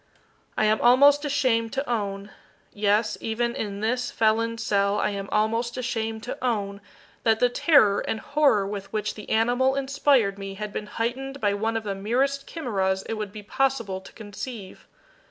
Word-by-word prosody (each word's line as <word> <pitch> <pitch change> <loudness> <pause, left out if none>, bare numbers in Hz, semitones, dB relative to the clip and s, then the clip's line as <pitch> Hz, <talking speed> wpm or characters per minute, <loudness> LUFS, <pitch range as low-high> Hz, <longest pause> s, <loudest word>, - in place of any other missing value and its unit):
I 215 - +3
am 215 +1 +2
almost 280 +4 +6
ashamed 255 -6 +1
to 275 +1 -2
own 200 -3 -3 0.4
yes, 210 +1 +1
even 235 +2 -1
in 200 -1 -4
this 245 +3 0
felon's 230 +1 +1
cell, 200 -2 +1
I 210 - 0
am 200 -1 -5
almost 230 +3 0
ashamed 225 -3 -3
to 245 - -6
own 200 -5 -1 0.4
that 220 -1 +2
the 245 - +4
terror 245 -6 +4
and 220 - -3
horror 280 -9 +2
with 200 0 -6
which 210 -1 -2
the 210 - -11
animal 245 +4 +2
inspired 270 -7 +2
me 195 0 -6
had 210 +1 -6
been 210 - -4
heightened 265 +5 -3
by 205 -4 +1
one 225 +2 -1
of 225 - -4
the 205 -2 -3
merest 260 +8 -1
chimeras 195 - -1
it - - -5
would 215 -3 -4
be 210 0 -9
possible 230 -5 -1
to - - -13
conceive. 210 -1 -8
220 Hz, 170 wpm, -25 LUFS, 205-250 Hz, 0.4 s, almost